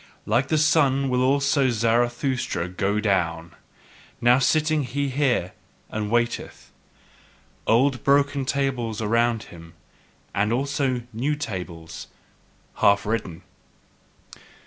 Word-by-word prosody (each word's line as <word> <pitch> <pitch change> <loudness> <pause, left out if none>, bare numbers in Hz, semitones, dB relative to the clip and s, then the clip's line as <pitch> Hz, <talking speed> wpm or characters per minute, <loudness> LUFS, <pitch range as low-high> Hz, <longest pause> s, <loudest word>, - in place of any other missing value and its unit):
Like 120 +5 +1
the 155 - +1
sun 140 -3 +3
will 125 0 +1
also 140 +1 +2
Zarathustra 120 -3 0
go 95 +3 -1
down: 85 -5 -1 0.7
now 120 +2 +4
sitteth 150 -1 +1
he 140 0 0
here 130 -9 0 0.4
and 105 -1 -3
waiteth, 120 +1 -2 1.0
old 130 +2 +2
broken 140 0 +2
tables 130 -5 -2
around 115 +1 +1
him, 85 -1 -13 0.6
and 105 +2 0
also 135 -1 -1
new 135 +7 -1
tables 90 - -7 0.7
half 100 0 +3
written. 105 -6 -3
120 Hz, 100 wpm, -24 LUFS, 105-140 Hz, 1.0 s, now